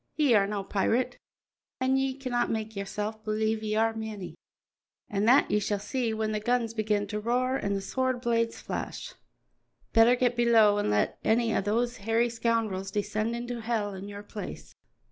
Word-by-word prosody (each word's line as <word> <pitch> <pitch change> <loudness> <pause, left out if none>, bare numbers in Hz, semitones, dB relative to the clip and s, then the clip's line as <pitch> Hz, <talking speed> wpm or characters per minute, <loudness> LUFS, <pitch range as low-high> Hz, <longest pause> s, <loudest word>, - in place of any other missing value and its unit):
"Ye 290 -5 +3
are 200 -2 +4
no 205 -1 -3
pirate, 235 +6 0 0.6
an' 260 +1 +2
ye 265 0 0
canna 250 -3 0
make 220 -1 -3
yoursel' 210 +2 -4
believe 220 0 0
ye 215 -1 -2
are 225 +1 +2
ane, 220 -4 -6 0.8
an' 200 0 0
that 250 +4 +5
ye 210 - +3
shall 205 0 -1
see 235 +3 -2
when 220 0 -1
the 215 - -1
guns 235 0 0
begin 210 -2 0
to 210 +1 -4
roar 250 +4 0
an' 200 0 -1
the 195 - -2
sword 260 +4 -1
blades 230 -1 0
flash. - - -5 0.8
Better 230 +2 +6
get 245 -1 +1
below 225 -4 +5
an' 205 - 0
let 105 0 +1
ane 225 0 +2
o' - - +2
these 235 +4 0
hairy 225 +3 +1
scoundrels 225 -5 -1
descend 210 +3 -1
into 240 0 -4
hell 220 -3 -1
in 190 +1 -7
your 205 0 -8
place." 210 0 -8
220 Hz, 180 wpm, -28 LUFS, 210-240 Hz, 0.8 s, Better